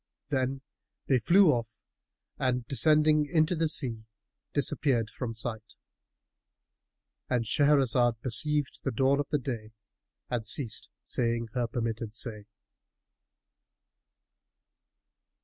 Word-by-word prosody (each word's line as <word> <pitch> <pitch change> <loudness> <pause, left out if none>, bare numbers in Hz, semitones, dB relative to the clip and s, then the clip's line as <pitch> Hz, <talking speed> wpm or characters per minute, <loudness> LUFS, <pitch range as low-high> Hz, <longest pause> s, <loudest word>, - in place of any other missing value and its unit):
Then 135 -1 -1 0.5
they 130 -2 +3
flew 175 - +5
off 115 -3 -3 0.6
and 125 -2 0
descending 150 +1 +3
into 160 +1 +2
the 165 0 +1
sea, 115 -8 0 0.5
disappeared 125 -4 +1
from 115 -3 -5
sight.——And 115 +1 -9
Shahrazad 125 -3 +3
perceived 145 +4 0
the - - 0
dawn 135 +3 +2
of 145 - -3
day 110 -4 -5 0.5
and 120 -2 -2
ceased 110 +2 0
saying 115 -1 -1
her 125 -2 -1
permitted 115 -1 -4
say. 110 -4 -2
125 Hz, 95 wpm, -29 LUFS, 115-145 Hz, 0.6 s, flew